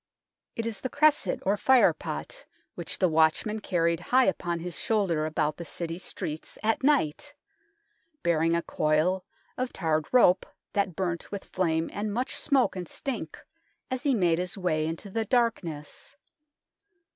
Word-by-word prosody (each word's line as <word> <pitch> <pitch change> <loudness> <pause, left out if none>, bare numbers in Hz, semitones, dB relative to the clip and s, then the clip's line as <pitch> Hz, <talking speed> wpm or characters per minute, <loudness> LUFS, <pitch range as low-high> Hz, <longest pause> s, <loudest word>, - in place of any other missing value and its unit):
It 230 - -3
is 225 -3 -4
the 260 - -3
cresset, 305 +2 +2
or 200 +2 +3
fire 260 +2 +5
pot, - - -6 0.3
which - - -5
the 185 - +3
watchman 160 +7 +2
carried 170 -4 +1
high 255 +8 +3
upon 175 -2 0
his 175 0 -5
shoulder 180 -8 +1
about 155 -1 -1
the 170 - -6
City 170 0 -5
streets 155 -4 -5
at 225 +1 +1
night, 285 - +1 0.9
bearing 165 0 +2
a 170 - 0
coil 155 +5 +1 0.4
of 255 0 -1
tarred 155 -4 0
rope 195 -8 +5 0.3
that 200 -4 0
burnt 175 -2 -3
with 200 -1 -5
flame 165 -3 0
and 210 +1 -2
much 245 +5 -2
smoke 275 -8 +2
and 180 -2 -5
stink 230 - -4 0.5
as 255 -1 -2
he 275 -1 +2
made 175 -5 +2
his 180 +2 -3
way 155 -5 0
in 165 - -2
the 205 +5 -3
darkness. 205 - -1
185 Hz, 155 wpm, -28 LUFS, 165-230 Hz, 0.9 s, fire